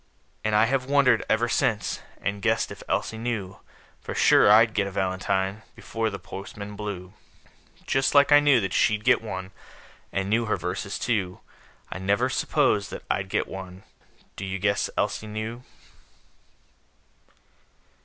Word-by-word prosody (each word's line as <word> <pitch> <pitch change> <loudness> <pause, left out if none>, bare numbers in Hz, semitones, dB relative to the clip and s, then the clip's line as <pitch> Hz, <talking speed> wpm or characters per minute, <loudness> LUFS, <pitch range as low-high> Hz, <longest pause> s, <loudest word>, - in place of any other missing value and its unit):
And 110 -1 +1
I 105 +1 +5
have 130 +1 0
wondered, 140 -5 +4
ever 115 +2 +2
since, 110 -3 0 0.2
And 100 +1 -3
guessed - - +1
if - - -9
Elsie 110 - -1
knew 110 -5 -4 0.4
For - - -7
sure - - +5
I'd 110 +1 +6
get 100 -2 0
a - - -6
valentine, 95 +2 -1
Before 115 -1 -3
the 100 - -6
postman 100 +2 -8
blew, 100 -3 -6 0.7
Just 135 +1 +1
like 140 0 +6
I 145 - +9
knew 145 -4 +4
that 95 -2 -3
she'd 105 0 +2
get 125 0 +4
one 95 -3 -6 0.6
And 95 0 -2
knew 115 +3 +1
her 110 - 0
verses, 90 +3 -4
too. 95 -7 -2 0.5
I - - -5
never 100 +2 +1
s'posed 100 -2 +1
that - - -8
I'd 95 - -1
get - - 0
one 95 0 -9 0.5
Do - - -7
you 95 0 -3
guess 100 +1 0
Elsie 110 - -1
knew? 110 +3 -5
105 Hz, 155 wpm, -25 LUFS, 95-115 Hz, 0.7 s, I